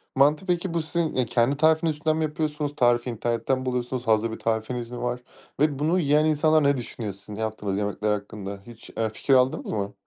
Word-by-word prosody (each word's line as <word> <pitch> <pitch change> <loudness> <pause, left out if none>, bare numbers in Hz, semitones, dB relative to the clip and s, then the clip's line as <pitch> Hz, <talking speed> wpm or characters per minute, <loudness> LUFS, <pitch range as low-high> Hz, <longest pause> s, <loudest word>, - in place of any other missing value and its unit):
Mantı, 150 +6 +3
peki 175 -1 -1
bu 165 - +1
sizin, 160 +1 -2
eee, 130 - +2
kendi 120 +4 +1
tarifiniz 160 0 +3
üzerinden 155 +1 0
mi 160 - 0
yapıyorsunuz? 150 -1 -2
Tarifi 120 -2 +2
internetten 120 +3 -1
mi 130 - -6
buluyorsunuz? 125 0 -2
Hazır 110 0 +2
bir - - -7
tarifiniz 115 +2 -2
mi 120 - -6
var? 125 0 -2 0.4
Ve 145 -2 +2
bunu 165 +5 +2
yiyen 150 -1 +3
insanlar 155 0 +3
ne 140 0 +3
düşünüyor 115 -4 -5
sizin 100 +2 -10
yaptığınız 110 -2 -3
yemekler 105 +1 -1
hakkında? 100 -1 -5
Hiç, 115 -1 -12
eee, 110 -1 +1
fikir 135 +5 0
aldınız 130 0 +2
mı? 100 -1 -2
125 Hz, 205 wpm, -25 LUFS, 110-150 Hz, 0.4 s, Mantı